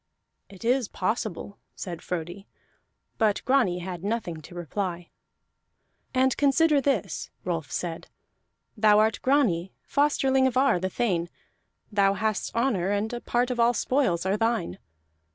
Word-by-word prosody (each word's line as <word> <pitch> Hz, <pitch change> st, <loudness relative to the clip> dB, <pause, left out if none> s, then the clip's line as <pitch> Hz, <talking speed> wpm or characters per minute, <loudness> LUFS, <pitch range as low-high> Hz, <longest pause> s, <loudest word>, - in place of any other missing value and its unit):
"It 195 Hz, +2 st, -11 dB
is 250 Hz, -1 st, +2 dB
possible," 200 Hz, -1 st, -3 dB, 0.2 s
said 175 Hz, -3 st, -6 dB
Frodi, 180 Hz, +3 st, -5 dB, 0.7 s
but 215 Hz, -3 st, +2 dB
Grani 250 Hz, -9 st, +3 dB
had 180 Hz, -1 st, -6 dB
nothing 200 Hz, -7 st, -3 dB
to 165 Hz, +3 st, -13 dB
reply. 175 Hz, 0 st, -4 dB, 1.0 s
"And 260 Hz, 0 st, +2 dB
consider 290 Hz, +1 st, +4 dB
this," 275 Hz, +1 st, -1 dB, 0.2 s
Rolf 165 Hz, -4 st, -3 dB
said. 170 Hz, -2 st, -4 dB, 0.7 s
"Thou 210 Hz, -1 st, +5 dB
art 220 Hz, +1 st, +2 dB
Grani, 210 Hz, -11 st, +2 dB
fosterling 270 Hz, -2 st, +2 dB
of 255 Hz, -, -1 dB
Ar 265 Hz, -8 st, +4 dB
the 185 Hz, +1 st, -2 dB
thane; 180 Hz, -5 st, -1 dB, 0.6 s
thou 200 Hz, -1 st, +3 dB
hast 215 Hz, +1 st, -1 dB
honor, 230 Hz, -7 st, +1 dB
and 205 Hz, +3 st, -1 dB
a 240 Hz, -, -4 dB
part 245 Hz, +1 st, 0 dB
of 245 Hz, -, -3 dB
all 235 Hz, +1 st, +4 dB
spoils 235 Hz, -12 st, +1 dB
are 195 Hz, +2 st, +1 dB
thine. 225 Hz, -, -1 dB
210 Hz, 135 wpm, -26 LUFS, 180-250 Hz, 1.0 s, Thou